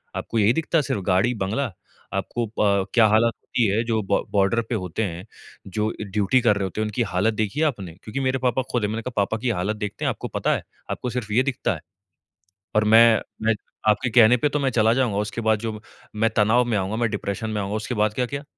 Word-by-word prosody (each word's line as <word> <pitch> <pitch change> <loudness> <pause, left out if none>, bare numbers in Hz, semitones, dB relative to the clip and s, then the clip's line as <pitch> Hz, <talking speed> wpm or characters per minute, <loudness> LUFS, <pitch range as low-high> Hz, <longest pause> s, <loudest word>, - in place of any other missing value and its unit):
आपको 115 - -2
यही 105 +2 +4
दिखता 165 +2 0
है - - +4
सिर्फ़ 105 -5 -2
गाड़ी-बंगला! 105 +5 +1 0.4
आपको 120 -1 -2
अ, 105 - -12
प 100 -2 +2
क्या 115 -3 +6
हालत 110 +2 +3
होती 120 - -1
है 105 +4 +1
जो 115 -2 0
ब - - +2
बॉर्डर 100 +3 +2
पे 120 - 0
होते 95 +1 -3
हैं, 90 -2 -5 0.4
जो 105 +3 -1 0.2
ड्यूटी 105 +5 +2
कर 105 -3 +3
रहे 100 - -2
होते 95 +3 -3
है, - - 0
उनकी 105 +3 -2
हालत 105 +5 +2
देखी 110 +5 -2
है 160 - +3
आपने?" 100 - -5
क्योंकि 110 +5 -4
मेरे 130 0 0
पापा 125 +2 +1
खुद 120 -3 0
है। - - +2
मैंने 110 +2 -3
कहा 125 +2 -6
पापा 105 +3 -1
की 120 +3 -2
हालत 105 0 -1
देखते 105 -2 -4
है - - +2
आपको - - -4
पता - - +1
है? - - -5 0.3
आपको 125 - -3
सिर्फ़ 120 -4 -4
ये 125 +4 +4
दिखता 125 - -1
है। - - -10 1.0
और 105 - +4
मैं 110 +1 +6 0.2
मैं 110 0 +3 0.3
आपके 120 +4 +2
कहने 115 +1 +6
पे 135 +5 +1
तो 145 - -1
मैं 135 -1 +1
चला 110 -2 +3
जाऊँगा। 120 -6 +1
उसके 105 +2 -3
बाद 110 -1 +2
जो 110 -1 -5 0.4
मैं 110 +1 +2
तनाव 110 +3 +4
में 120 -3 -1
आऊँगा 95 +3 -2
मैं 115 -1 0
डिप्रेशन 105 +2 -3
में 105 -1 -2
आऊँगा। 100 +1 -2
उसके 110 +3 -3
बाद 105 -1 +1
का 125 +1 0
क्या? 140 +3 -6
110 Hz, 240 wpm, -23 LUFS, 105-120 Hz, 1.0 s, क्या